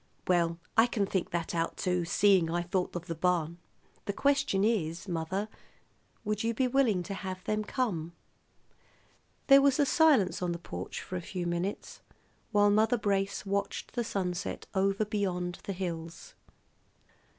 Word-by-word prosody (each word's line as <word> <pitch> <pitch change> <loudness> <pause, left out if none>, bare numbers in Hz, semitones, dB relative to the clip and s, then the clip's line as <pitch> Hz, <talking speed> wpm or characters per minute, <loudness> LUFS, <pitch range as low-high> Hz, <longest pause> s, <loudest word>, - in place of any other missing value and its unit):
"Well, 170 -2 +2 0.2
I 225 +2 +6
can 215 -4 0
think 190 -2 -2
that 170 -1 -3
out, 165 -1 -1
too, 180 -2 0
seeing 190 -1 +4
I 175 +1 0
thought 180 +1 -2
of 175 -1 -4
the 165 - -3
barn. 170 0 0 0.5
The 200 - -2
question 275 -7 +2
is, 175 -6 0
mother, 180 +4 -2 0.8
would 210 0 -1
you 230 0 0
be 255 +3 +2
willing 240 -8 +2
to 185 - -5
have 185 -1 -6
them 215 0 -1
come!" 185 -9 -2 1.3
There 275 0 +8
was 275 -1 +4
silence 295 - +4
on 175 -1 0
the - - -4
porch 90 - -6
for 185 - -5
a - - -4
few 180 0 -5
minutes 175 +4 -3 0.5
while 205 -1 +4
Mother 220 +3 +3
Brace 200 -2 -1
watched 200 0 -2
the 240 - -1
sunset 180 -4 -3
over 195 +2 +1
beyond 180 -4 -2
the 200 - -3
hills. 170 -3 -6
190 Hz, 155 wpm, -30 LUFS, 175-210 Hz, 1.3 s, There